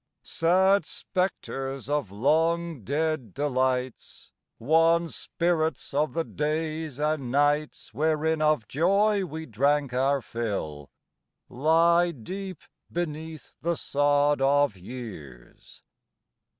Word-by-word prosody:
Sad 190 +4 +3
spectres 135 -8 -3
of 145 -8 -1
long 160 +6 +1
dead 145 -3 -2
delights, 130 -2 -2 0.3
Wan 165 +6 +3
spirits 165 -4 -1
of 150 +2 +1
the 165 - +1
days 155 -1 -3
and 150 -4 -1
nights 145 -4 0
Wherein 155 +3 +1
of 150 -8 +2
joy 195 +6 +2
we 160 -1 -6
drank 140 +2 +1
our 135 +2 +2
fill, 100 - -4 0.6
Lie 170 +5 +3
deep 185 - -7 0.3
beneath 160 -2 -5
the 170 +1 0
sod 145 0 +2
of 140 -3 +3
years. 90 - -11
150 Hz, 100 wpm, -26 LUFS, 130-165 Hz, 0.6 s, Sad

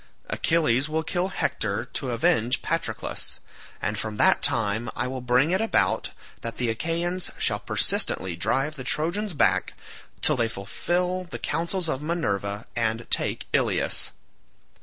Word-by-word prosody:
Achilles 150 -4 +2
will 160 +1 0
kill 175 +2 0
Hector 110 - -1
to 130 +1 -4
avenge 115 0 +1
Patroclus, - - -3 0.4
and 105 +1 -2
from 110 -1 -3
that - - +5
time 110 +1 +3
I 120 - 0
will 130 0 -4
bring 125 +6 +3
it 190 +3 +2
about 100 - +2 0.3
that 115 0 -4
the 120 -2 0
Achaeans 170 +8 -1
shall - - +1
persistently 95 -2 +2
drive 135 - 0
the 130 - -5
Trojans 170 +8 0
back - - +2 0.5
till - - +4
they 115 -1 +1
fulfil 180 - -1
the 175 - -6
counsels 170 +2 -2
of 135 -3 -1
Minerva 105 - -2
and 115 0 0
take - - +1
Ilius. - - +1
125 Hz, 140 wpm, -26 LUFS, 110-170 Hz, 0.5 s, that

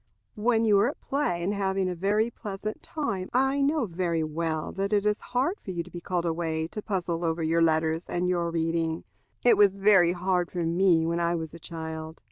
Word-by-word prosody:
When 225 +1 +2
you 205 -2 +5
are 215 +5 +3
at 290 - -8
play, 270 -12 -1
and 195 +4 0
having 195 -1 0
a 180 - -1
very 205 +6 +1
pleasant 215 -1 -6
time, 200 - -3
I 270 +2 +2
know 285 -1 +2
very 170 -3 -1
well 160 0 -2
that 195 +1 -2
it 205 0 +2
is 210 0 +2
hard 270 +11 -1
for - - -10
you 175 -2 -2
to 180 - -15
be 175 - -7
called 175 -1 -2
away 160 -1 -1
to 210 - -6
puzzle 175 -4 -2
over 165 0 0
your 165 +1 +2
letters 160 0 +1
and 175 +1 0
your 175 -2 0
reading. 165 0 -1 0.4
It 245 - +6
was 200 -1 +5
very 195 -4 +5
hard 180 -1 0
for 175 -2 -3
me 170 0 +3
when 170 +1 0
I 170 0 +1
was 160 -2 -5
a 170 - -10
child. 160 -1 -7
180 Hz, 215 wpm, -27 LUFS, 165-205 Hz, 0.4 s, It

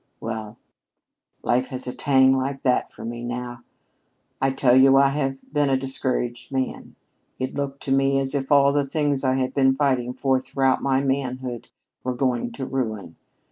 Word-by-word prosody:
Well, 110 0 -6 0.9
life 125 +2 +1
has 130 -2 -6
a 125 - -4
tang 130 -1 +4
like 135 +1 -3
that 125 -2 +1
for - - -10
me 120 +1 -5
now. 120 0 -5 0.8
I 135 - +3
tell 130 -2 +3
you, 135 +1 +6
I 140 0 +5
have 135 -1 -3
been 145 -2 +2
a 135 - +3
discouraged 130 -2 -3
man. 130 -1 -3 0.4
It 130 0 -3
looked 140 -1 -4
to 135 - -3
me 135 0 +3
as 135 0 +1
if 135 -1 -2
all 140 -1 +6
of - - 0
the 145 0 +2
things 145 -1 0
I 130 -1 +2
had 130 0 -1
been 135 -1 +3
fighting 130 -3 0
for 135 -2 +1
throughout 135 0 0
my 135 -1 +1
manhood 130 -3 -3 0.4
were 125 0 -2
going 120 -2 -1
to 130 +2 -5
ruin. 110 -10 -4
130 Hz, 180 wpm, -23 LUFS, 125-135 Hz, 0.9 s, you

